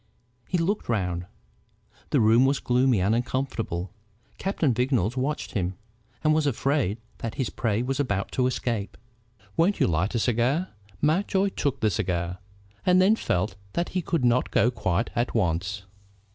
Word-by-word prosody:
He 180 - +1
looked 185 - -1
round. 90 -5 -1 0.8
The - - +3
room 115 +3 +5
was 135 0 +2
gloomy 125 -2 +2
and 100 +4 +2
uncomfortable. 120 -7 -2 0.5
Captain 170 -9 +1
Vignolles 125 -3 +1
watched 135 +4 -2
him, 95 -4 -2 0.5
and 155 0 +4
was 155 -1 +2
afraid 135 -5 +1 0.2
that 115 - -4
his 130 -5 -2
prey 115 -1 0
was 135 +2 -2
about 100 -8 -1
to 125 -1 +1
escape. 115 -5 -2 0.6
"Won't 180 +5 +2
you - - +4
light 90 +6 0
a - - +3
cigar?" 125 +10 +1 0.3
Mountjoy 190 +5 +2
took 140 -7 -2
the 110 -1 +3
cigar, 90 0 -2 0.4
and 180 0 +4
then 195 +4 +5
felt 95 - -1 0.2
that 170 - -1
he 185 - -1
could 165 -6 0
not 120 +1 +3
go 120 - +3
quite 95 -2 -1
at 120 0 -1
once. 95 0 0
120 Hz, 160 wpm, -26 LUFS, 100-145 Hz, 0.8 s, room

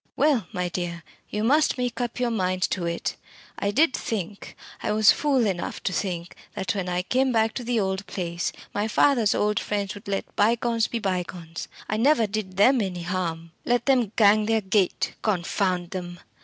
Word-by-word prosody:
Well, 270 - +2
my 180 -1 -2
dear, 175 -1 -4 0.3
you 210 - -2
must 295 +6 +3
make 250 0 -2
up 240 0 -3
your 245 -1 +1
mind 185 -4 0
to 175 -3 -1
it. 170 0 -3 0.4
I 200 - 0
did 275 +6 +3
think 200 -2 -4 0.2
I - - -1
was 215 -1 +6
fool 275 -5 +2
enough 185 -4 -3
to 190 - -1
think 175 -2 -3 0.2
that 190 +2 -1
when 190 -3 -3
I 180 0 0
came 260 +6 +1
back 225 -1 +2
to 250 - -4
the 240 -1 0
old 190 0 -2
place, 170 -2 -3 0.2
my 205 +1 0
father's 230 -2 +3
old 210 0 +1
friends 200 -2 -2
would 205 +1 -12
let 195 -1 -3
bygones 230 +1 +2
be 235 - -3
bygones. 180 -5 -4 0.2
I 215 - -1
never 250 0 +4
did 200 -3 -4
them 250 +5 +5
any 180 -3 -3
harm. 170 -2 -3
Let 245 0 +1
them 250 -7 +3
'gang 215 0 +5
their 225 -1 +2
gait,' 190 -1 +1
confound 180 -2 0
them!" 175 -2 -6
205 Hz, 185 wpm, -25 LUFS, 180-230 Hz, 0.4 s, was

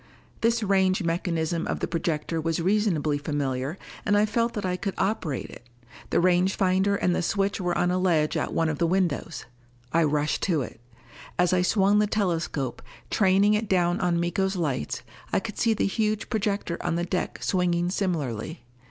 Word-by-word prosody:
This 230 0 +2
range 190 -1 +2
mechanism 165 -1 -1
of - - -2
the - - -1
projector 165 -1 -2
was 165 +1 -1
reasonably 170 -6 +1
familiar, 145 +1 -2 0.3
and 205 0 +2
I 210 - +4
felt 230 +2 0
that 205 -2 -2
I 180 -1 0
could 195 +1 -3
operate 180 - -1
it. 120 - -13 0.4
The - - +2
range 180 +2 +3
finder 190 +1 +2
and 180 -3 +1
the - - 0
switch 200 +3 0
were 175 -1 0
on 180 - +2
a 180 - +1
ledge 165 -5 +2
at - - -1
one 165 - +1
of 155 -2 -2
the 170 - +2
windows. 175 -2 -1 0.5
I 165 +1 +4
rushed 150 0 0
to 160 -6 +2
it. 115 - -10 0.6
As 180 0 +3
I 180 - +3
swung 200 +2 +3
the 210 - +3
telescope, 165 - -1 0.3
training 200 +1 +4
it 210 0 0
down 175 -1 +2
on 175 -2 +1
Miko's 190 +3 0
lights, 145 - -2 0.3
I - - +3
could 210 +1 -7
see 225 -2 +3
the - - +1
huge 215 +1 -1
projector 200 -5 -1
on - - -1
the 170 0 -1
deck 180 +1 -2
swinging 175 -1 +1
similarly. 160 - -2
180 Hz, 185 wpm, -26 LUFS, 165-200 Hz, 0.6 s, I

